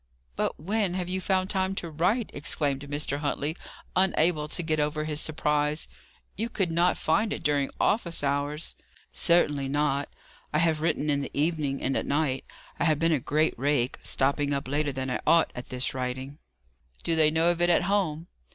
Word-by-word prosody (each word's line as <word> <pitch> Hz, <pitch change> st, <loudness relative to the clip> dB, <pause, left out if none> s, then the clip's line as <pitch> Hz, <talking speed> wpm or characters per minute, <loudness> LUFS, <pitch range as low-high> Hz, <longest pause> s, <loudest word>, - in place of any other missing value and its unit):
"But -, -, -1 dB
when 195 Hz, +2 st, 0 dB
have 180 Hz, -1 st, -3 dB
you 185 Hz, +1 st, -1 dB
found 185 Hz, 0 st, +1 dB
time 190 Hz, -1 st, 0 dB
to 170 Hz, -3 st, -4 dB
write?" 190 Hz, +9 st, +1 dB
exclaimed 145 Hz, -2 st, -1 dB
Mr. 145 Hz, 0 st, -2 dB
Huntley, 145 Hz, +1 st, -1 dB, 0.4 s
unable 175 Hz, -4 st, +2 dB
to 175 Hz, -, -3 dB
get 155 Hz, -1 st, 0 dB
over 150 Hz, +1 st, 0 dB
his 155 Hz, -1 st, -1 dB
surprise. 150 Hz, -1 st, 0 dB, 0.5 s
"You 225 Hz, +3 st, -2 dB
could 195 Hz, -7 st, -1 dB
not 170 Hz, +2 st, +3 dB
find 210 Hz, +7 st, +1 dB
it -, -, -4 dB
during 145 Hz, -2 st, +2 dB
office 170 Hz, -8 st, +1 dB
hours?" 145 Hz, +2 st, -1 dB, 0.4 s
"Certainly 150 Hz, -5 st, +2 dB
not. 145 Hz, 0 st, 0 dB, 0.4 s
I -, -, +3 dB
have 160 Hz, -1 st, +2 dB
written 155 Hz, -2 st, +1 dB
in 140 Hz, 0 st, +1 dB
the 140 Hz, -, -5 dB
evening, 150 Hz, -3 st, 0 dB
and 135 Hz, -, 0 dB
at -, -, -1 dB
night. 140 Hz, -2 st, 0 dB, 0.3 s
I -, -, +2 dB
have 155 Hz, -2 st, +3 dB
been 165 Hz, +2 st, +2 dB
a 155 Hz, -, +3 dB
great 155 Hz, +5 st, +1 dB
rake, 135 Hz, -2 st, +1 dB
stopping 140 Hz, +1 st, 0 dB
up 140 Hz, 0 st, -2 dB
later 145 Hz, +1 st, 0 dB
than 130 Hz, -1 st, -3 dB
I -, -, -2 dB
ought, 165 Hz, 0 st, +5 dB
at 125 Hz, -, -8 dB
this 125 Hz, +1 st, -1 dB
writing." 130 Hz, +2 st, -4 dB, 0.6 s
"Do 165 Hz, -, +2 dB
they 155 Hz, -1 st, +5 dB
know 165 Hz, +2 st, +3 dB
of 175 Hz, 0 st, -3 dB
it 175 Hz, -, +4 dB
at 175 Hz, -, +4 dB
home?" 175 Hz, -5 st, 0 dB
155 Hz, 190 wpm, -27 LUFS, 145-170 Hz, 0.6 s, ought